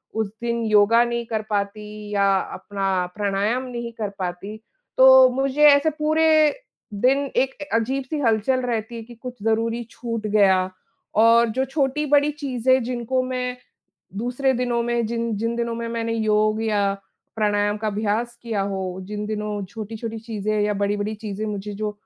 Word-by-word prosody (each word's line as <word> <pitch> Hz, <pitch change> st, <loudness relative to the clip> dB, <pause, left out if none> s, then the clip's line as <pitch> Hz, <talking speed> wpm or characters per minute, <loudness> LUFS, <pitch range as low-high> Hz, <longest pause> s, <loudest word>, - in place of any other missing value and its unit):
उस 220 Hz, -1 st, 0 dB
दिन 235 Hz, 0 st, -1 dB
योगा 215 Hz, +3 st, +5 dB
नहीं 235 Hz, 0 st, -2 dB
कर 220 Hz, -1 st, -2 dB
पाती 210 Hz, +1 st, -4 dB
या 200 Hz, -1 st, +3 dB, 0.2 s
अपना 195 Hz, -2 st, -2 dB
प्राणायाम 205 Hz, +4 st, 0 dB
नहीं 235 Hz, -2 st, -5 dB
कर 215 Hz, -3 st, -4 dB
पाती। 185 Hz, +3 st, -5 dB, 0.4 s
तो 260 Hz, 0 st, +8 dB
मुझे 270 Hz, +3 st, 0 dB
ऐसे 285 Hz, +2 st, +5 dB
पूरे, 310 Hz, 0 st, +3 dB, 0.4 s
दिन 260 Hz, +7 st, +2 dB
एक 265 Hz, 0 st, +2 dB
अ, 290 Hz, -, -3 dB
अजीब-सी 265 Hz, +5 st, -2 dB
हलचल 245 Hz, +1 st, +1 dB
रहती 235 Hz, -1 st, -3 dB
है 230 Hz, -, -6 dB
कि 240 Hz, +2 st, -13 dB
कुछ 245 Hz, -2 st, -9 dB
ज़रूरी 230 Hz, +1 st, 0 dB
छूट 230 Hz, -2 st, -4 dB
गया 190 Hz, -3 st, +3 dB, 0.5 s
और 230 Hz, +1 st, +6 dB
जो 260 Hz, -, +1 dB
छोटी-बड़ी 290 Hz, +1 st, +1 dB
चीज़ें 260 Hz, -3 st, +1 dB
जिनको 245 Hz, +1 st, -1 dB
मैं 250 Hz, -1 st, -3 dB, 0.6 s
दूसरे 250 Hz, +3 st, 0 dB
दिनों 240 Hz, -1 st, 0 dB
में 235 Hz, 0 st, 0 dB
जिन 230 Hz, -1 st, -2 dB
जिन 230 Hz, +2 st, -1 dB
दिनों 235 Hz, -1 st, -2 dB
में 230 Hz, 0 st, -4 dB
मैंने 230 Hz, 0 st, -2 dB
योग 215 Hz, 0 st, +1 dB
या 215 Hz, -2 st, +1 dB, 0.6 s
प्राणायाम 205 Hz, -1 st, +1 dB
का 215 Hz, +1 st, -4 dB
अभ्यास 215 Hz, +3 st, -1 dB
किया 225 Hz, -4 st, -2 dB
हो, 190 Hz, -2 st, -3 dB
जिन 210 Hz, +2 st, -5 dB
दिनों 210 Hz, -1 st, -3 dB
छोटी-छोटी 225 Hz, +2 st, -6 dB
चीज़ें 215 Hz, -1 st, -2 dB
या 210 Hz, 0 st, +1 dB
बड़ी-बड़ी 205 Hz, +1 st, -1 dB
चीज़ें 210 Hz, -1 st, -5 dB
मुझे 205 Hz, -1 st, -4 dB
जो 210 Hz, +1 st, -2 dB
230 Hz, 160 wpm, -23 LUFS, 210-250 Hz, 0.6 s, तो